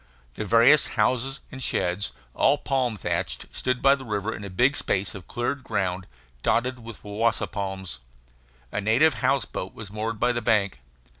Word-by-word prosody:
The 105 - -4
various 115 +8 +6
houses 130 +5 +1
and 130 -2 -8
sheds, 90 -4 -1 0.2
all 140 +2 +4
palm 130 -6 0
thatched, - - -2
stood 125 -1 -2
by 135 0 +7
the 140 -1 -3
river 105 -2 -2
in - - -8
a 100 - -6
big 125 +10 +3
space 95 -6 0
of 95 -3 -9
cleared 125 +3 -2
ground, 95 -5 -2 0.3
dotted 125 - +1
with 115 -2 -10
wawasa 105 +3 0
palms. 95 -2 -5 0.7
A 105 - -2
native 120 +10 +4
house 140 -1 +2
boat 95 - -6
was 105 -3 -9
moored 110 +1 -3
by 125 - +3
the 120 -1 -2
bank. 105 - +1
115 Hz, 170 wpm, -26 LUFS, 100-130 Hz, 0.7 s, by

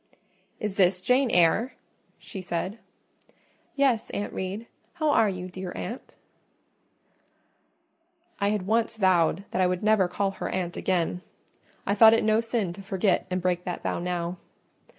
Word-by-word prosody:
"Is 210 -2 -4
this 180 -1 +4
Jane 250 +6 +2
Eyre?" 180 +8 +3 0.4
she 195 - -8
said. 185 +4 -3 1.0
"Yes, 260 -5 +2
Aunt 205 - -4
Reed. 195 +4 -4 0.3
How 310 -2 +1
are 225 -7 +4
you, 180 -1 -5
dear 185 0 -6
aunt?" 240 - -7 2.2
I 200 - +2
had 205 -3 -1
once 225 +2 +1
vowed 185 -2 +3
that 185 - 0
I 185 - +4
would 180 +2 -2
never 215 -3 +4
call 195 +2 -1
her - - -5
aunt 180 -2 -3
again: 180 -1 -1 0.6
I 200 - +1
thought 220 +2 +8
it 225 - +1
no 215 0 +3
sin 225 -6 -2
to 195 - -10
forget 195 -1 0
and 185 -1 -2
break 180 -1 0
that 180 - -4
vow - - -1
now. 175 0 -3
190 Hz, 150 wpm, -26 LUFS, 180-220 Hz, 2.2 s, thought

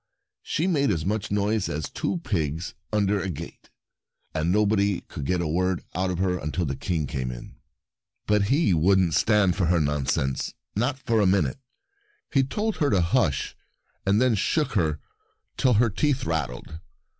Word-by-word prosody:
She 160 - -1
made 150 -7 +2
as 85 -6 -1
much 105 +1 -1
noise 105 0 0
as 75 0 -3
two - - -2
pigs 80 -2 -2 0.2
under 105 -1 +1
a 95 - -3
gate, 85 0 -8 0.6
and 80 +2 0
nobody 100 -1 +2
could 70 - -7
get 90 -1 +1
a - - -1
word 90 +3 0
out 95 +1 0
of 90 - -2
her 90 -1 0
until 80 +4 -2
the 70 -2 -2
King 80 -1 -2
came 65 -2 -3
in. - - -8 0.7
But 105 -1 +2
he 135 - +3
wouldn't 90 +1 +3
stand 105 -3 +3
her 85 -2 +2
nonsense, 70 -3 -1 0.2
not 125 +6 0
for 115 -4 +1
a 100 - +4
minute. 90 - +1 0.7
He 135 - +5
told 210 +9 -2
her 145 - +2
to 100 - +3
hush, 85 - +1 0.5
and 100 +2 +3
then 130 -1 +3
shook 150 - +1
her 80 -6 0 0.6
till 130 - +3
her 115 +1 +3
teeth 135 +5 0
rattled. 80 -1 -3
95 Hz, 170 wpm, -25 LUFS, 80-110 Hz, 0.7 s, He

